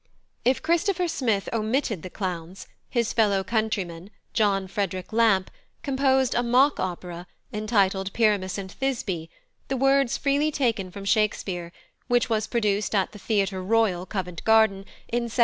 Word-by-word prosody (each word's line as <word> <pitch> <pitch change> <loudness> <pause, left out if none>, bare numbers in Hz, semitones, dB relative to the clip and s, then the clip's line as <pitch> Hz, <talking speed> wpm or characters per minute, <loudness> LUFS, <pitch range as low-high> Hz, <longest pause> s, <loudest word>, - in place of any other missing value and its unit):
If 255 +4 +2
Christopher 350 +3 +1
Smith 235 - 0
omitted 225 - 0
the 185 - -7
clowns, 180 -1 -5 0.2
his 235 -3 0
fellow 205 -4 +2
countryman, 195 -5 -2 0.2
+John 195 -3 +2
Frederick 185 -1 -3
Lampe+, 220 -5 +3 0.3
composed 265 -2 +2
a 240 - +2
mock 255 +4 +3
opera, 175 -1 -4 0.3
entitled 200 -3 +1
Pyramus 205 -5 +1
and 190 -1 -6
Thisbe, 200 -11 -3 0.4
the 270 - -1
words 270 -1 +3
freely 285 +2 +1
taken 230 -10 0
from 195 +2 -9
Shakespeare, 195 -5 0 0.4
which 245 -1 +2
was 215 -1 +1
produced 210 -3 0
at 195 -2 +1
the 210 - -11
Theatre 195 -3 0
Royal, 190 -3 +1
Covent 180 -4 -4
Garden, 220 -3 +4 0.2
in 240 0 -1
1745. 235 +1 -6
215 Hz, 145 wpm, -25 LUFS, 190-240 Hz, 0.4 s, Garden